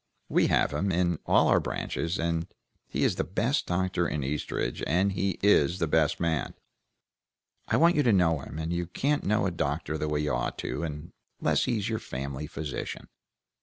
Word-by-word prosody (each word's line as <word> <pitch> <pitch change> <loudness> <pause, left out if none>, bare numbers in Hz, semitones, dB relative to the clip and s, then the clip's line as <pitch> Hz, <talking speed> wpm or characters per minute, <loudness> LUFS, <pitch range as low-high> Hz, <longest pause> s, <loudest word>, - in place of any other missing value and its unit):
We - - +3
have - - +2
him, 95 +1 0
in 85 -2 +1
all - - +5
our - - +5
branches; 85 +4 -3 0.7
he - - -1
is - - +2
the - - +1
best 120 +9 0
doctor 90 -1 0
in 75 -2 -2
Eastridge, 70 +3 -2
and 95 +4 +2
he 95 -1 -1
is 90 -4 +4
the 85 - +1
best 80 -1 +2
man. 80 -3 -1 1.1
I - - +2
want 170 +2 +5
you 150 - +4
to 125 -5 +3
know 85 -6 +3
him, 65 +2 -8
and 80 +1 -2
you 85 0 -2
can't 145 - 0
know 105 +1 +2
a 95 - 0
doctor 80 -1 -2
the 75 - -1
way 75 0 0
you 75 -2 -1
ought - - -2
to, 70 +3 -3 0.6
unless - - +2
he's 110 -5 -1
your 110 -1 -1
family 70 +3 -5
physician." 75 -2 -5
85 Hz, 185 wpm, -28 LUFS, 75-100 Hz, 1.1 s, all